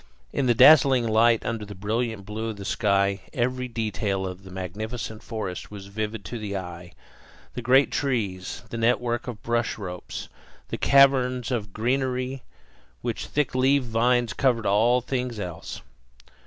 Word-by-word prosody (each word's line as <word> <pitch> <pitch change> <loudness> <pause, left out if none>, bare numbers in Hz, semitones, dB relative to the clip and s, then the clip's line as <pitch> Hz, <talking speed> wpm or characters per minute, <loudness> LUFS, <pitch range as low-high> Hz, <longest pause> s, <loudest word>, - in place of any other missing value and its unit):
In 130 - 0
the 120 - +4
dazzling 130 -2 +7
light, 115 +1 +4
under 115 -2 -2
the 105 0 -8
brilliant 110 +1 -2
blue 110 +2 -4
of 110 - -5
the 100 - -8
sky, 100 -2 +1
every 125 +1 -1
detail 105 -4 -2
of 90 0 -6
the 95 - -11
magnificent 110 +5 -5
forest 105 -6 -5
was 100 -2 -9
vivid 110 -1 -3
to 120 +6 -5
the 100 -2 -3
eye: 90 -1 -8 0.6
the - - -4
great 135 +3 +4
trees, 105 -10 -2
the 115 - -4
network 120 +1 +1
of 115 -4 -7
bush 120 0 0
ropes, 90 -4 -6 0.4
the - - -3
caverns 130 -3 +4
of 105 -5 -2
greenery, 130 +3 -1 0.6
where - - 0
thick 150 -2 -2
leaved 130 +1 +3
vines 120 +1 +2
covered 120 -5 +1
all 115 +5 +3
things 125 -2 -3
else. 90 -4 -6
115 Hz, 155 wpm, -25 LUFS, 100-125 Hz, 0.6 s, dazzling